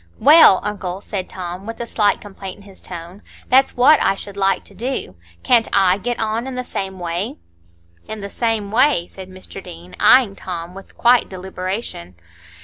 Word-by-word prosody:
"Well, 295 - +7
uncle," 195 -3 -4
said 195 -2 -5
Tom, 180 +2 -7
with 230 - -7
a 235 - -3
slight 210 -3 +1
complaint 195 -2 -9
in - - -16
his 195 -1 -16
tone, 175 +3 -9 0.3
"that's 265 0 +4
what 280 +5 +6
I 195 - +2
should 200 0 -9
like 195 -1 +1
to - - -14
do. 235 - -4 0.3
Can't 235 -2 +4
I 190 -1 +4
get 240 +4 -3
on 225 +3 -2
in 265 - -5
the 250 - -3
same 190 -5 -5
way?" 175 +3 -4 0.7
"In 220 - -6
the 200 - -5
same 225 -4 -1
way?" 250 -5 +3
said 190 +1 -11
Mr 185 +1 -10
Deane, 175 0 -11
eyeing 215 -1 +5
Tom 175 -2 -7
with 195 +1 -13
quiet 240 0 +4
deliberation. 185 - -6
195 Hz, 180 wpm, -19 LUFS, 185-230 Hz, 0.7 s, Well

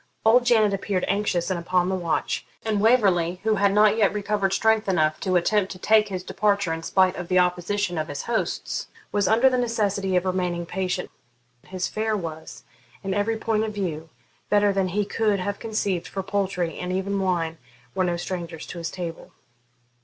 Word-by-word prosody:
Old 240 +2 +5
Janet 215 -4 +4
appeared 195 -1 -1
anxious 195 -3 0
and 180 - -1
upon 180 +1 +1
the 190 - -1
watch; 170 -3 -1 0.2
and 215 -2 0
Waverley, 190 -7 +3
who 220 0 +2
had 200 0 +3
not 210 +1 +4
yet 210 -3 +3
recovered 205 -1 -1
strength 220 +1 +2
enough 155 -4 +2
to 185 -2 -1
attempt 190 +2 +2
to - - -11
take 215 +3 +4
his 185 -2 -5
departure 200 -3 0
in 165 - -4
spite 185 +2 +2
of 175 - -6
the 185 - +2
opposition 180 0 +1
of 155 - -2
his 145 - -5
hosts, 235 -1 -2 0.2
was 205 -1 +1
under 235 +4 +5
the 255 -1 +2
necessity 205 -5 0
of 180 0 +2
remaining 180 -2 -1
patient. 180 +1 -3 0.6
His 185 -1 -3
fare 215 0 -1
was, 160 -4 -7 0.4
in 195 -1 -2
every 205 +3 0
point 220 -1 0
of 215 -1 -4
view, 165 -5 -3 0.4
better 205 -1 +3
than 195 -1 +1
he 200 +3 -1
could 210 -1 0
have 200 +2 -3
conceived, 205 -6 -2
for 195 - -4
poultry, 185 -4 -2
and 180 0 -3
even 195 +2 -1
wine, 170 -4 -1 0.3
were 185 - +1
no 175 -1 0
strangers 170 -2 -5
to 175 - -8
his 165 - -3
table. 170 -3 -7
195 Hz, 190 wpm, -24 LUFS, 180-210 Hz, 0.6 s, Old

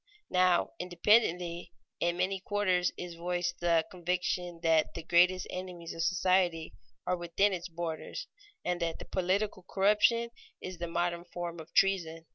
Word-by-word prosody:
Now, 180 -1 +3
independently, 175 -2 +1 0.3
in 175 0 0
many 190 +1 0
quarters 185 -2 +1
is 180 -1 -6
voiced 175 +1 -2
the 170 -2 +3
conviction 180 -1 -2
that 160 -1 +3
the 165 - -5
greatest 180 +3 +4
enemies 180 -2 -6
of 165 - -5
society 180 -2 +1 0.3
are 180 - +1
within 175 +4 +1
its 175 -1 -4
borders, 170 - -5 0.4
and 180 0 -1
that 165 -1 -3
political 190 +2 0
corruption 210 +4 +3 0.3
is 185 -2 -7
the 170 - -3
modern 170 0 -1
form 175 -1 -6
of 160 +1 -11
treason. 165 -4 +2
175 Hz, 140 wpm, -31 LUFS, 170-185 Hz, 0.4 s, greatest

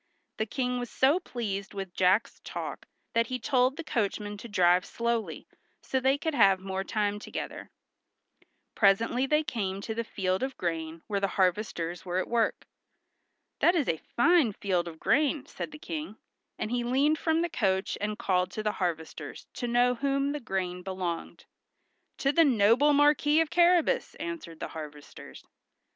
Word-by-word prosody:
The 220 - -1
King 250 +1 -1
was 245 -1 -4
so 280 +7 +3
pleased 200 - -5
with 195 -2 -5
Jack's 185 +5 +2
talk - - -6 0.3
that 230 0 +2
he 255 - -2
told 255 +2 +2
the 330 - -4
coachman 210 -5 -2
to 220 - -9
drive 180 -3 +4
slowly, 235 0 -2 0.4
so 265 - 0
they 265 +2 +2
could 320 +2 -2
have 200 -7 +5
the 185 - -16
more 190 0 -2
time 205 0 -1
together. - - -6 1.0
Presently 230 +6 +3
they 300 +2 +3
came 195 -8 -3
to 220 - -4
the 230 +1 -2
field 190 -4 -1
of 265 0 -3
grain 165 -1 -3
where 205 -3 -1
the 195 - +1
harvesters 180 -3 0
were 180 0 -3
at 185 - 0
work. 235 -2 0 0.9
"That 350 - +4
is 300 -7 +1
a 160 - +1 0.2
fine 295 - +4
field 180 -3 -1
of 160 -1 -9
grain," 285 +2 +2
said - - -6
the 300 - -9
King; 305 -7 -6 0.4
and 215 - -3
he 245 -1 0
leaned 275 +6 +2
from 325 0 +1
the - - +1
coach 190 - 0
and 210 0 -2
called 185 -5 +1
to 215 - -4
the 210 - +1
harvesters 165 -3 -4
to 245 - -4
know 245 +1 +3
to 240 - -11
whom 275 0 +1
the 295 - -3
grain 185 -6 -3
belonged. 180 -3 -5 0.7
"To 275 - +2
the 330 +3 +5
noble 250 +2 +4
Marquis 295 +1 +4
of 325 -2 +1
Carrabas!" 350 +6 +3
answered 320 - -6
the - - -4
harvesters. 150 -2 -10
225 Hz, 175 wpm, -29 LUFS, 190-275 Hz, 1.0 s, have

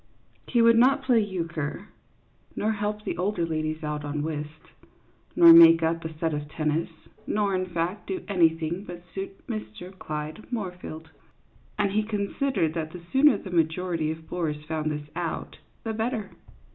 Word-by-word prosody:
He 235 -2 +3
would 230 0 +6
not 270 +3 +4
play 250 -3 +4
euchre, 170 -3 -3 0.7
nor 215 - 0
help 210 0 -3
the - - -3
older 185 -2 0
ladies 155 0 -3
out 150 -1 -3
on 145 0 -3
whist, 150 0 -6 0.6
nor 170 -1 +10
make 165 0 +9
up 165 +1 0
a 160 -1 -7
set 160 0 -1
of 150 0 -4
tennis, 155 +1 -1 0.4
nor, 205 -2 +1
in 185 0 0
fact, 175 +3 -3
do 370 -2 -3
anything 165 -1 +1
but 175 -3 -9
suit 195 0 -7
Mr. 110 - -7
Clyde 155 +5 -6
Moorfield; 180 -7 -6 0.7
and 205 -2 +1
he 215 +2 +2
con 210 -2 -3
sidered 260 - +1
that 160 -2 -3
the 180 - -8
sooner 270 -3 +6
the 190 - -9
majority 165 -1 0
of 160 0 -6
bores 155 -4 -3
found 155 -1 -2
this 150 -1 -5
out 170 -2 -4 0.2
the 225 - -3
better. 220 -2 -2
170 Hz, 165 wpm, -26 LUFS, 155-205 Hz, 0.7 s, nor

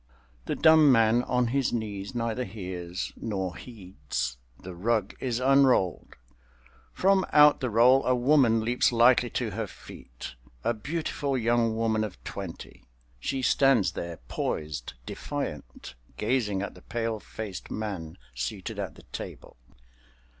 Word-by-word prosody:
The - - -2
dumb 160 -3 +6
man 115 0 +4
on 125 -1 +1
his 135 +1 +1
knees 105 -2 -4
neither 115 +1 -1
hears 90 -3 -5
nor 95 -5 -3
heeds. 90 - -5 0.2
The 95 - -9
rug 105 +3 0
is 125 -2 -1
unrolled. 130 -8 +3 0.8
From 195 0 +3
out 150 0 +7
the 130 - -1
roll 125 +4 +5
a 130 - +4
woman 125 -3 +4
leaps 120 +3 +2
lightly 120 +1 +5
to 115 -3 -2
her 110 +2 -3
feet—a - - -7
beautiful 140 +2 -2
young 115 -1 +1
woman 110 -1 +1
of 105 -4 -5
twenty. 95 -4 -8 0.4
She 130 - -2
stands 120 -7 +4
there, 85 -1 -6
poised, 75 -2 -3
defiant, 65 +2 -6 0.2
gazing 105 -4 0
at - - -5
the - - -15
pale 115 -1 -3
faced 100 -3 -7
man 95 -7 -5 0.2
seated 60 0 -4
at - - -4
the - - -15
table. - - -8
110 Hz, 130 wpm, -27 LUFS, 95-125 Hz, 0.8 s, out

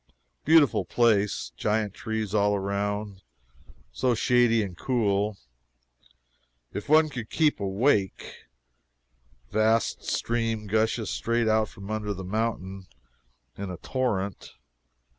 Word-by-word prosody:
Beautiful 145 -10 +5
place 105 -1 +1
giant 105 -1 0
trees 110 -3 -4
all 105 -1 +3
around 100 0 -3 0.7
so 120 - +1
shady 120 -1 +3
and 95 -3 -6
cool, 105 -3 0 1.4
if 105 - -6
one 155 +1 +6
could 125 -7 -6
keep 155 -8 +2
awake 100 +1 0 1.1
vast 110 +2 +1
stream 115 -2 -1
gushes 110 +1 0
straight 115 0 0
out 110 -1 +2
from 95 +2 -9
under 105 -1 -2
the 95 - -7
mountain 95 -2 -3 0.7
in 100 -1 -5
a 90 - -6
torrent. 105 -7 -2
110 Hz, 105 wpm, -26 LUFS, 100-115 Hz, 1.4 s, one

